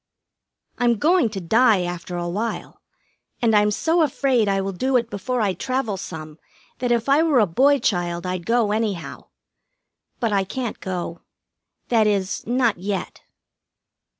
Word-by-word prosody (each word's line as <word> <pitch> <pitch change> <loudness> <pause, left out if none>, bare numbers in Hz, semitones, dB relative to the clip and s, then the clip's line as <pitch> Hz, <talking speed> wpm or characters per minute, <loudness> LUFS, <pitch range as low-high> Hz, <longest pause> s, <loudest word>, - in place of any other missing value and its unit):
I'm 240 -1 +3
going 325 - +3
to 205 -2 -5
die 215 +2 +3
after 175 0 -5
a 175 0 -3
while, 210 +7 -4 0.6
and 230 -3 +2
I'm 210 0 +4
so 325 +11 +1
afraid 265 -6 +2
I 195 0 +1
will 195 0 -2
do 255 +8 +1
it 235 -1 -2
before 245 +5 -2
I 200 -3 +1
travel 255 +2 -2
some 155 -4 -8 0.4
that 245 -1 -1
if 235 0 +1
I 280 +3 +4
were 320 -5 +3
a 215 - +5
boy 270 +11 +3
child 175 -6 -1
I'd 180 -1 -4
go 230 -3 +2
anyhow. 210 -5 -3 0.9
But 225 -3 0
I 195 -1 +2
can't 240 +4 -5
go. 175 -2 -5 0.7
That 225 -3 +3
is, 195 -2 -1
not 240 -5 +1
yet. 195 +1 -4
215 Hz, 155 wpm, -22 LUFS, 185-250 Hz, 0.9 s, a